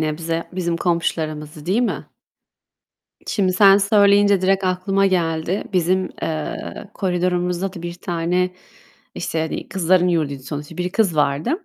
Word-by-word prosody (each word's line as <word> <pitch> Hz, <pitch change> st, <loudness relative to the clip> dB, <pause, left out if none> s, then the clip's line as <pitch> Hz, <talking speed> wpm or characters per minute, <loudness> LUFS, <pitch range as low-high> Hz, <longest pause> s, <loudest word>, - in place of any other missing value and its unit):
nebze 165 Hz, +2 st, -2 dB
bizim 170 Hz, -2 st, -1 dB
komşularımızdı, 155 Hz, -3 st, -2 dB
değil 210 Hz, +7 st, +2 dB
mi? -, -, -2 dB, 1.2 s
Şimdi 190 Hz, -3 st, +1 dB
sen 195 Hz, +1 st, +7 dB
söyleyince 200 Hz, -1 st, +4 dB
direkt 195 Hz, +1 st, +2 dB
aklıma 190 Hz, +2 st, +1 dB
geldi. 170 Hz, 0 st, 0 dB
Bizim, 185 Hz, 0 st, +1 dB
eee, 155 Hz, -, -4 dB
koridorumuzda 180 Hz, 0 st, -1 dB
da 175 Hz, -3 st, -9 dB
1 170 Hz, 0 st, -5 dB
tane, 180 Hz, 0 st, -1 dB, 0.6 s
işte, 160 Hz, -, -3 dB
hani 160 Hz, -, -4 dB
kızların 180 Hz, -1 st, +2 dB
yurduydu 150 Hz, -6 st, -1 dB
sonuçta, 145 Hz, +3 st, -7 dB
bir 180 Hz, 0 st, -2 dB
kız 195 Hz, -8 st, +1 dB
vardı 150 Hz, -, 0 dB
180 Hz, 130 wpm, -21 LUFS, 160-190 Hz, 1.2 s, sen